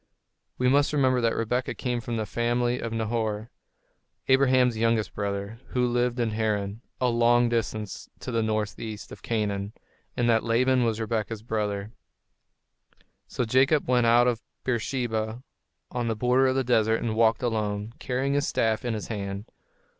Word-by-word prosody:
We 125 - +1
must 145 +3 +3
remember 130 -3 +3
that 115 -1 +1
Rebekah 125 +3 -1
came 125 -2 -2
from 115 0 -3
the 110 - -1
family 120 +2 0
of 115 - -4
Nahor, 110 -1 -2 0.8
Abraham's 130 -2 +4
younger 115 0 +2
brother, 100 +2 -3
who 125 -1 0
lived 120 0 0
in 115 -2 +1
Haran, 105 -1 -1 0.2
a 125 - +2
long 120 0 +4
distance 110 -3 -3
to 125 - -5
the 115 -1 +1
northeast 110 0 -3
of - - -10
Canaan, 105 -2 -2 0.4
and 120 - +2
that 115 -2 +3
Laban 125 +2 +3
was 115 -1 0
Rebekah's 110 -1 -2
brother. 105 -2 -2 1.4
So 125 - -2
Jacob 135 +6 +3
went 125 -2 +3
out 120 +1 +6
of 120 -2 0 0.2
Beersheba, 120 -2 -2 0.5
on 120 -1 -2
the 115 - 0
border 125 +4 +3
of 130 - +1
the 135 - +2
desert, 115 -2 +2
and 110 -2 -2
walked 115 +1 +3
alone, 105 -2 -1
carrying 130 +2 -1
his 145 0 +1
staff 110 -1 +1
in 120 -2 -1
his 105 - -6
hand. 100 -1 -5
115 Hz, 160 wpm, -26 LUFS, 110-125 Hz, 1.4 s, out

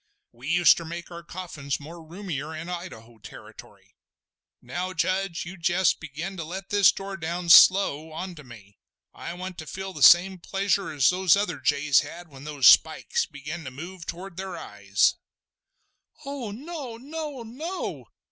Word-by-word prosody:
We 145 +9 -1
uster 170 0 +5
make 170 +2 -8
our 170 0 -8
coffins 170 -6 -5
more 165 +3 -11
roomier 160 -3 -6
in 160 +3 -7
Idaho 120 -11 -8
territory. - - -14 0.7
Now, 175 +9 -5
Judge, 185 +1 -1
you 185 +3 -9
jest 175 +2 +2
begin 160 +5 -6
to 165 - -4
let 190 +5 -7
this 205 -2 +5
door 195 0 -7
down, 170 +1 -4
slow, 165 -4 +6
on 180 +4 -6
to 150 -3 -12
me. 100 -6 -15 0.3
I 170 - -7
want 185 0 -7
to 155 - -8
feel 190 +2 -6
the 150 - -8
same 180 +5 +7
pleasure 195 +1 -1
as 140 -4 +3
the 185 0 +4
other 175 -8 -2
jays 140 +2 +3
had 175 0 -7
when 135 -1 -13
those 145 -3 -1
spikes - - +5
began 150 +4 -7
to 130 - -6
move 170 +6 -9
toward 180 +1 -7
their 190 -2 -5
eyes!" 100 -6 0 1.1
"Oh 275 -5 -5
no! 265 +1 -7
no! 290 0 -6
no!" 310 +11 -6
175 Hz, 160 wpm, -26 LUFS, 150-190 Hz, 1.1 s, same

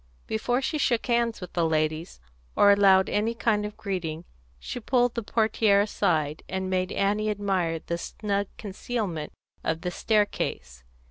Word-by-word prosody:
Before 245 +4 -1
she 305 +3 -1
shook 240 -5 +1
hands 235 -3 +1
with 180 - -8
the 170 - +1
ladies, 155 - -1 0.4
or 205 - +6
allowed 195 -2 +5
any 220 +3 0
kind 210 -3 +1
of 210 - -11
greeting, 175 -6 -4 0.3
she 155 - -6
pulled 245 0 +2
the 235 - -3
portière 215 -2 +3
aside, 155 -7 0
and 190 0 -2
made 185 -1 0
Annie 210 +2 +1
admire 190 -5 0
the 170 +1 -4
snug 200 +1 -2
concealment 195 -6 -4 0.3
of 160 0 -1
the 180 0 -2
staircase. 175 - -1
200 Hz, 150 wpm, -26 LUFS, 170-220 Hz, 0.4 s, or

